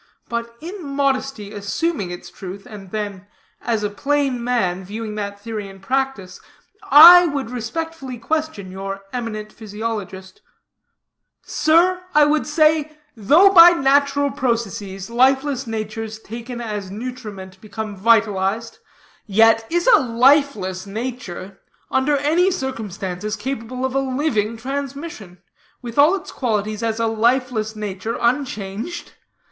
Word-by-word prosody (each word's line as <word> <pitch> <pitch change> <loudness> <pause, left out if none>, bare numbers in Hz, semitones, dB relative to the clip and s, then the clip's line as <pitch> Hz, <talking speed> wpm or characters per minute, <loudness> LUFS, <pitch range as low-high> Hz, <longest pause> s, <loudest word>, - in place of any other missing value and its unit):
But 235 0 -5
in 355 +3 -7
modesty 275 -6 -2
assuming 205 - -2
its 175 0 -8
truth, 195 +1 -9
and 205 -5 -11
then, 205 -2 -5 0.3
as 225 -3 -1
a 210 - 0
plain 275 +1 -1
man 190 -7 0
viewing 215 +3 -6
that 200 -1 -5
theory 215 -1 -6
in 195 0 -13
practice, 220 -4 -2 0.5
I 345 +5 +10
would 280 -6 -3
respectfully 265 +2 -5
question 305 -7 -3
your 195 +1 -6
eminent 215 -3 -5
physiologist: 210 -3 -6 1.0
'Sir,' 350 +4 +2
I 300 -1 +7
would 300 +1 +1
say, 305 0 +2 0.2
'though 300 - +5
by 345 -2 +9
natural 280 -1 +2
processes, 225 -6 -3
lifeless 265 +2 +2
natures 220 0 -5
taken 235 +3 -8
as 210 -4 -5
nutriment 205 -4 -8
become 215 0 -6
vitalized, 215 +1 +1 0.5
yet 225 +2 +4
is 345 +1 0
a 455 -4 +7
lifeless 235 -6 +2
nature, 200 -4 -6 0.3
under 285 +2 +2
any 320 +7 +2
circumstances, 215 - -4
capable 255 0 -4
of 260 - -3
a 270 - +2
living 255 -5 -1
transmission, 270 - -6 0.4
with 235 +2 -4
all 305 +7 +6
its 385 - -7
qualities 215 -3 -2
as 225 0 -1
a 230 - +1
lifeless 225 0 0
nature 210 +1 -4
unchanged? 235 - -2
230 Hz, 125 wpm, -20 LUFS, 205-275 Hz, 1.0 s, I